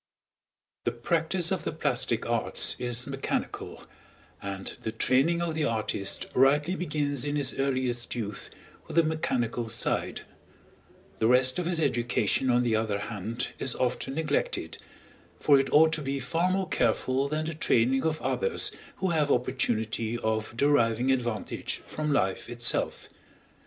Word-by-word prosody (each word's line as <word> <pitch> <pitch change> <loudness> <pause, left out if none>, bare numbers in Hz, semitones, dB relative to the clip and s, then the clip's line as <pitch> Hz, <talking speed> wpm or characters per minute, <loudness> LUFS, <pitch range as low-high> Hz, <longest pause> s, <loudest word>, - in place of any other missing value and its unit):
The 120 - 0
practice 165 +8 0
of - - -1
the - - -2
plastic - - 0
arts - - +1
is 120 0 0
mechanical, 135 -1 -4 0.6
and 95 -1 -5
the 110 - -3
training 140 +9 +2
of 165 -2 -2
the 155 -1 0
artist 110 -3 -1
rightly 145 +6 +3
begins 145 -6 -1
in 145 0 -2
his 140 -3 +1
earliest 130 -3 -1
youth 105 -4 -4 0.4
with - - -8
the 170 - +5
mechanical 125 -8 -1
side; 115 - 0 1.0
the 110 - +3
rest 130 +4 +5
of 175 - -2
his 175 -2 +2
education, 120 -3 +1
on 125 0 +3
the 115 -2 +1
other 110 -2 0
hand, 110 +3 -4
is 130 - +1
often 125 +2 -2
neglected, 150 -2 -1 0.6
for 140 -2 +5
it 135 - -1
ought 160 +1 +5
to 155 - 0
be 140 -1 -2
far 165 +8 0
more 190 0 0
careful 130 +3 +1
than 155 +2 -2
the 165 - -3
training 135 -3 +2
of 160 -1 0
others 475 0 +2 0.2
who 190 - -1
have 155 -4 +1
opportunity 115 -3 0
of 110 0 -2
deriving 125 -3 +3
advantage 120 -5 -2
from 155 -1 -3
life 95 -9 0
itself. 120 0 +2
130 Hz, 145 wpm, -28 LUFS, 115-155 Hz, 1.0 s, the